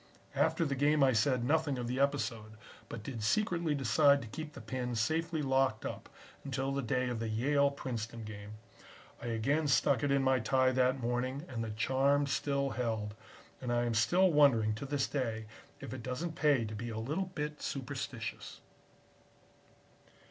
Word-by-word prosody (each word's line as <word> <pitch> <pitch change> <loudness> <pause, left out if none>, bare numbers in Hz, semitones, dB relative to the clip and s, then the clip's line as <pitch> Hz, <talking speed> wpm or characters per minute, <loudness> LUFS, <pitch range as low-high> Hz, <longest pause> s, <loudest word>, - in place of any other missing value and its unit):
"After 165 - +2
the 140 - -1
game 145 +2 +3
I 130 -1 +5
said 120 +2 +2
nothing 150 -1 +1
of 120 - -3
the 125 +2 -2
episode, 115 -6 -1 0.4
but 115 -2 -7
did 120 -2 -6
secretly 170 - +1
decide 140 +3 +4
to - - -8
keep 155 +7 -7
the - - -9
pin 125 -2 -4
safely 160 +7 0
locked 135 -4 +1
up - - -6 0.3
until 135 -1 -2
the 140 0 -1
day 125 +1 0
of 120 -2 -3
the 115 -1 -2
Yale 140 +6 +2
Princeton 115 -4 -5
game. 105 -1 -8 0.7
I - - -5
again 140 +7 +1
stuck 140 -1 +3
it 145 - 0
in 140 0 +3
my 130 -1 +3
tie 130 +3 +3
that 130 +1 +2
morning 125 +4 -2
and 115 -6 -4
the 110 - -4
charm 135 +6 +2
still 140 0 0
held, 110 -4 -2 0.5
and 125 - -3
I 120 0 +2
am 120 - 0
still 175 - +4
wondering 130 -8 +4
to 125 +6 -6
this 140 -1 0
day, 115 -5 -2 0.3
if 115 - -7
it 130 - -6
doesn't 130 +8 -3
pay 145 -7 +2
to 110 - -6
be 115 +3 -5
a 110 - -5
little 150 +12 -2
bit 150 0 -4
superstitious." 135 -3 -5
130 Hz, 175 wpm, -33 LUFS, 115-145 Hz, 0.7 s, I